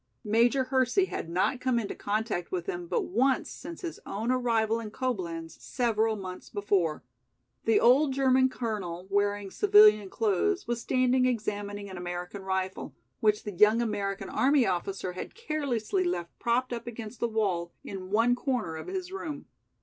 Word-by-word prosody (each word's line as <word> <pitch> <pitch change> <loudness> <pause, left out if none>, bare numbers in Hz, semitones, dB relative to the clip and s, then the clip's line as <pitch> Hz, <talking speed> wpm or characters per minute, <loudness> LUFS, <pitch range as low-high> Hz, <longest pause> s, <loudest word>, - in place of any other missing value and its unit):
Major 235 +5 +3
Hersey 260 +8 +2
had 170 - -5
not 185 +9 0
come 255 -2 +1
into 220 -4 -2
contact 210 -4 -2
with 180 -2 -2
him 175 0 -4
but - - 0
once 255 +7 +1
since 335 +2 -8
his 340 -2 -5
own 220 +5 -2
arrival 230 -3 +1
in 225 -2 -6
Coblenz 180 -10 -4
several 225 -3 0
months 185 -3 -8
before. 195 -6 0 0.6
The 225 - +4
old 270 +4 +5
German 260 -1 +3
Colonel, 200 -8 -4
wearing 205 0 0
civilian 210 - +6
clothes, 230 - 0
was 240 -1 -1
standing 255 +1 +2
examining 205 -3 -3
an 190 -2 -8
American 175 +2 -5
rifle, 190 -6 -3 0.2
which 210 -1 +2
the 210 - -4
young 210 +4 +5
American 205 -4 -2
army 275 -2 +3
officer 185 0 -2
had 180 - -7
carelessly 305 - -1
left 175 - -2
propped 245 +2 0
up 235 0 -6
against 230 0 -7
the 235 - +1
wall 190 -6 -1
in 185 -2 -7
one 230 +4 +3
corner 245 - -2
of - - -8
his 370 -1 -4
room. 325 -7 -5
220 Hz, 160 wpm, -29 LUFS, 195-255 Hz, 0.6 s, civilian